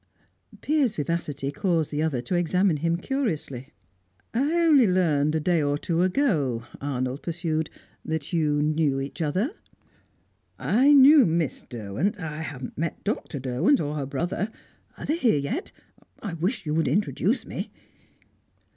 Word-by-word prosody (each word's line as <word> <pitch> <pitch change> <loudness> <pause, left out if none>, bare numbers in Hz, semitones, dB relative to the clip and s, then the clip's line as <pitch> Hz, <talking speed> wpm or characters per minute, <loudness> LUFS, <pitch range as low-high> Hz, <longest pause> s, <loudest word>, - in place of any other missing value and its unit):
Piers' 285 -7 +1
vivacity 145 -3 -2
caused 165 0 0
the 150 0 -1
other 145 -6 -1
to 155 - -4
examine 175 0 +2
him 165 +3 0
curiously. 160 - -3 0.6
"I 275 +7 +1
only 285 -8 +6
learned 155 -5 +2
a - - +2
day 170 +1 +2
or 145 0 +1
two 165 +2 -1
ago," 180 - +1 0.2
Arnold 130 -1 -2
pursued, 160 -2 -2 0.3
"that 160 0 -4
you 150 -3 +2
knew 150 -3 +1
each 140 +5 -5
other." 185 - 0 1.1
"I 260 +7 +3
knew 285 +1 +8
Miss 165 -3 -1
Derwent. 120 - -2
I 155 -2 -5
haven't 135 -5 -7
met 165 0 -3
Dr. 205 -7 -3
Derwent 130 - +2
or 150 0 -2
her 140 -3 -3
brother. 175 +8 -2 0.5
Are - - -7
they 310 - 0
here 240 - +3
yet? 210 - -3 0.5
I 200 -6 -5
wish 190 +6 -2
you 150 - -1
would 160 +1 +1
introduce 205 - +1
me." - - -5
160 Hz, 145 wpm, -25 LUFS, 145-200 Hz, 1.1 s, knew